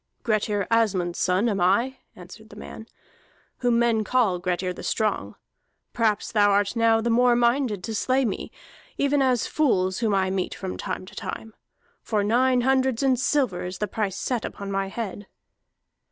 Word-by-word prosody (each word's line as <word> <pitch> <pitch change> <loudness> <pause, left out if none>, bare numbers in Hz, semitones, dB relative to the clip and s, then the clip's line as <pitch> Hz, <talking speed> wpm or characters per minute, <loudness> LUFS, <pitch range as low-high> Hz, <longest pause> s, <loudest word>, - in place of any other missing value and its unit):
"Grettir 210 -2 0
Asmund's 195 -7 +1
son 185 +5 +2
am 200 -5 -1
I," 235 +9 +2 0.2
answered 185 +5 -13
the 205 - -13
man, 220 +1 -10 0.7
"whom 245 -2 +2
men 235 -2 +2
call 215 -6 +1
Grettir 180 +1 -2
the - - -10
Strong. 215 -1 -1 0.6
Perhaps 215 -3 0
thou 205 -2 +4
art 200 +2 +1
now 225 -1 +3
the 235 +1 0
more 245 +1 +4
minded 235 -4 +1
to 225 - -4
slay 255 +5 +1
me, 205 - -4 0.5
even 280 0 +2
as 255 -3 +2
fools 190 -11 +1
whom 220 -4 +1
I 190 -1 +1
meet 190 -1 -2
from 190 -1 -5
time - - -5
to - - -14
time. 220 0 -6 0.5
For 210 -2 -1
nine 250 +4 +3
hundreds 265 -1 +1
in 265 -1 +4
silver 255 -7 0
is 180 +1 -5
the 210 - -2
price 205 -2 -3
set 245 -3 -2
upon 200 -1 -6
my 195 0 -1
head." 205 -1 -6
220 Hz, 170 wpm, -24 LUFS, 195-245 Hz, 0.7 s, thou